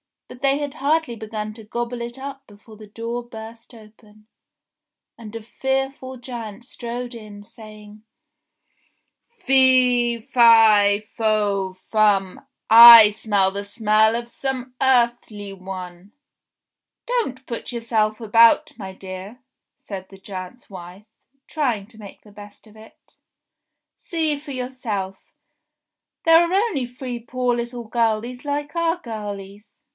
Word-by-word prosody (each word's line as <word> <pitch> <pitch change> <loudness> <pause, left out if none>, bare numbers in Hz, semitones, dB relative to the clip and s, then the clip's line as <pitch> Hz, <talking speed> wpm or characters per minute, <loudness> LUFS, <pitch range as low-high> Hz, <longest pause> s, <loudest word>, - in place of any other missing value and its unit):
But 250 - -13
they 275 0 +2
had 290 -1 -5
hardly 300 -3 0
begun 215 -1 -6
to 225 - -12
gobble 240 +2 -5
it 240 +2 -6
up 275 0 -9
before 215 +1 -16
the 215 0 -13
door 230 +3 -5
burst 230 0 -12
open, 215 -1 -19 0.9
and 225 -2 -11
a 225 - -7
fearful 265 +2 -3
giant 240 -2 -8
strode 245 0 -7
in 210 -3 -11
saying: 215 0 -14 0.7
" 470 0 -45
Fee 250 -3 +4
fi 220 -4 +6
fo 205 -4 0
fum, 200 +3 0 0.2
I 230 -1 +11
smell 205 -2 0
the 200 +1 -5
smell 215 +1 +2
of 235 0 -4
some 260 -1 -5
earthly 235 -5 +1
one 185 0 -9 0.9
"Don't 355 - -2
put 235 - -6
yourself 225 -2 -1
about, 230 +1 +4
my 190 -2 -7
dear," 190 +6 -10 0.3
said 190 -2 -9
the 195 - -14
giant's 190 +4 -9
wife 185 +1 -11 0.4
trying 245 -10 -2
to 225 -1 -14
make 200 -2 -13
the 210 - -17
best 205 +1 -14
of 215 -1 -19
it. 220 +1 -18 0.8
"See 315 -4 -2
for 290 0 -10
yourself. 245 -7 -5 1.1
They 330 - +4
are 340 +1 +5
only 380 - 0
three 245 0 -7
poor 245 +1 -2
little 240 0 -5
girlies 230 +2 -2
like 290 +2 -4
our 335 0 0
girlies. 205 - -9
230 Hz, 130 wpm, -21 LUFS, 210-250 Hz, 1.1 s, I